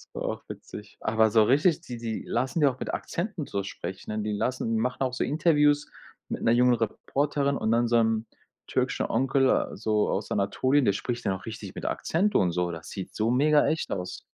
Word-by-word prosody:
Das - - -4
war - - -1
auch - - -5
witzig. 105 0 -10
Aber 110 0 +2
so 110 0 +6
richtig 145 - +3
die 120 - -7
die 115 -1 -4
lassen 130 +8 -1
ja 145 - +6
auch 130 - -18
mit - - -4
Akzenten 175 -3 -3
so 100 -6 -3
sprechen, 100 +3 -5
die 105 0 -2
lassen 125 +3 -1
die 115 -1 +1
machen 125 +2 -2
auch 130 -2 0
so 130 - -1
Interviews 150 -1 +2 0.4
mit - - -4
'ner 115 - +4
jungen 125 +1 +5
Reporterin 140 +5 0
und 110 - 0
dann 120 +1 +3
so 120 - +1
'nem 110 -1 +2 0.4
türkischen - - 0
Onkel 135 +2 +2
so 105 0 +1
aus - - -2
Anatolien, 130 +8 +2
der 100 - +3
spricht 120 +4 -4
dann 100 - +2
auch 95 0 -7
richtig 105 -4 -7
mit - - -6
Akzent 200 +6 0
und 90 -2 +3
so, 90 0 -1
das 80 -1 -8
sieht 95 - -7
so 110 +2 +1
mega 145 +4 +4
echt 160 - -1
aus. 90 -1 -4
120 Hz, 215 wpm, -27 LUFS, 105-140 Hz, 0.4 s, so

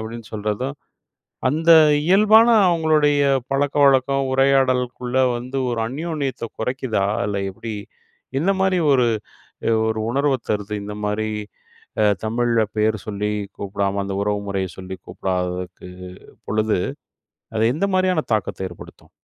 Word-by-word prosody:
அப்டின்னு 110 0 -8
சொல்றதும், 110 +6 -3 0.7
அந்த 165 +4 +3 0.3
இயல்பான 215 +5 +6 0.2
அவங்களுடைய 155 -3 +3 0.3
பழக்கவழக்கம் 135 -1 +2
உரையாடலுக்குள்ள 130 -2 +1 0.2
வந்து 125 +3 -6
ஒரு 115 - -2
அந்யோன்யத்த 145 -2 -3
குறைக்குதா? 120 -4 -1 0.2
இல்ல 100 -1 -2
எப்படி? 110 +3 -7 0.7
இந்த 185 +6 +2
மாதிரி 190 -1 +2 0.2
ஒரு, 125 -2 +3 0.8
ஒரு 110 0 -1
உணர்வ 140 +2 +1 0.2
தருது? 105 0 -2
இந்த 105 0 -6
மாதிரி 110 +1 -1 1.0
தமிழ்ல 115 +1 +1 0.2
பெயர் 110 0 +2
சொல்லி 105 0 -2 0.3
கூப்பிடாம, 100 0 -2
அந்த 100 0 -4
உறவு 105 0 0
முறைய 95 -1 -1
சொல்லி 95 0 -7
கூப்பிடாததுக்கு 90 -1 -4 0.6
பொழுது, 110 -2 0 0.8
அது 110 +2 +3
எந்த 200 +6 0
மாதிரியான 185 -4 +1
தாக்கத்த 95 -3 -2
ஏற்படுத்தும்? 85 - -14
120 Hz, 110 wpm, -21 LUFS, 105-140 Hz, 1.0 s, இயல்பான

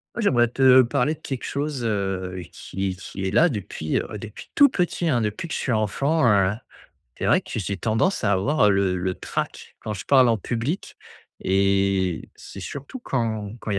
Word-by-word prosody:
Ouais 235 - -2
j'aimerais 120 - +4
te 130 +1 +6
parler 130 +3 +1
de - - -26
quelque 135 -3 -5
chose, 140 -2 -3
heu, 95 -4 -2
qui 95 -1 -4
qui 95 0 -6
est - - -2
là 165 - +5
depuis, 100 - -2
ouais, 105 - -7
depuis 105 0 -10
tout 285 -1 +7
petit 175 -5 -1
hein 125 -6 +2
depuis 110 +9 -3
que - - -4
je - - -2
suis 130 - -1
enfant, 135 +8 +1
heu, 100 -4 +4 0.6
c'est - - -5
vrai - - +4
que - - -6
j'ai 100 -2 -3
tendance 115 - 0
à 100 - +3
avoir 105 +4 +3
le 95 -2 +2
le 90 +1 -2
trac - - -5
quand 105 - -4
je 95 - -7
parle 130 -3 +5
en 115 - +3
public 120 - -3 0.4
et 95 -2 +1
c'est - - -11
surtout 140 - -7
quand 110 - -2
quand - - -5
il 100 - 0
110 Hz, 195 wpm, -24 LUFS, 100-135 Hz, 0.6 s, tout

